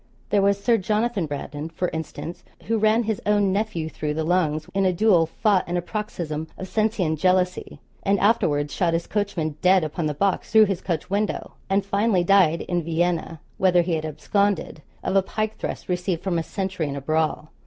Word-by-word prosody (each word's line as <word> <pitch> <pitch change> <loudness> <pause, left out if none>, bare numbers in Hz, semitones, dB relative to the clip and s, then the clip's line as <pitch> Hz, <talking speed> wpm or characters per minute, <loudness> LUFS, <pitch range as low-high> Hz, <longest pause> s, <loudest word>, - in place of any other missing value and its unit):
There 205 - +4
was 200 0 +2
Sir 230 +3 +3
Jonathan 210 -2 0
Brandon, 145 +2 -5
for 175 +2 -2
instance, 160 +1 -6 0.2
who 225 0 0
ran 215 +2 +3
his 220 -2 -2
own 205 -2 +2
nephew 200 -6 -1
through 150 -1 -3
the 160 - -1
lungs 155 -2 0
in 195 0 +1
a 185 - +3
duel 180 -3 +3
fought 200 +2 +1
in 175 - 0
a - - 0
paroxysm 170 -7 -4
of 190 - -6
Cencian 215 -6 0
jealousy; 180 +1 0 0.2
and 200 0 +1
afterwards 150 -9 +2
shot 170 -3 +1
his 170 - -2
coachman 175 -8 -2
dead 185 -1 +5
upon 155 +1 -2
the 150 - -2
box 195 +4 0
through 220 -1 +7
his 190 -3 -2
coach 175 0 -3
window, 205 +1 -1 0.2
and 195 0 +1
finally 200 -2 +2
died 175 -3 +4
in 175 -1 -1
Vienna, 165 0 -1 0.2
whither 180 -2 +4
he 170 0 -1
had 155 -1 -1
absconded, 200 +2 -1 0.2
of 190 - -1
a 195 - +6
pike 215 +3 -3
thrust - - -5
received 180 -1 -2
from 180 -3 0
a - - 0
sentry 185 -3 -3
in 140 - -4
a 140 - -5
brawl. 155 +1 -1
180 Hz, 195 wpm, -24 LUFS, 160-200 Hz, 0.2 s, through